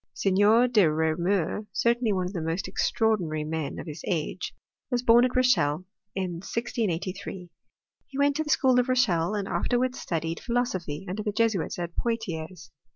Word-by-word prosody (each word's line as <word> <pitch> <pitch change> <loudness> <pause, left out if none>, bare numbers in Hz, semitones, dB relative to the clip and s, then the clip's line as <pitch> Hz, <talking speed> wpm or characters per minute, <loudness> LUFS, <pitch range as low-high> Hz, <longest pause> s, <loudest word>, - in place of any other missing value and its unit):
Seigneur 205 +5 +4
de 210 -9 +4
Reau 160 0 +1
mur, 190 +3 0
certainly 235 -1 +2
one 185 -2 0
of 180 - -5
the 175 - -3
most 165 +4 -2
extraordinary 180 -9 0
men 155 -1 -3
of - - -6
his 155 -1 -7
age, 165 -6 -2 0.4
was 245 -1 0
born 235 0 +6
at 255 - -2
Rochelle, 185 -11 +2 0.3
in 185 -3 -2
1683. 190 -5 -3 0.6
He 270 - -9
went 285 0 +3
to 315 - 0
the 300 - -8
school 260 -4 +4
of 250 +1 0
Rochelle, 215 -8 +2
and 200 -2 -2
afterwards 245 +8 0
studied 165 0 -3
philosophy 190 - -2
under 190 +4 -3
the 210 - -1
Jesuits 220 -4 0
at 175 -1 -5
Poitiers. 185 -8 -4
195 Hz, 165 wpm, -27 LUFS, 170-235 Hz, 0.6 s, born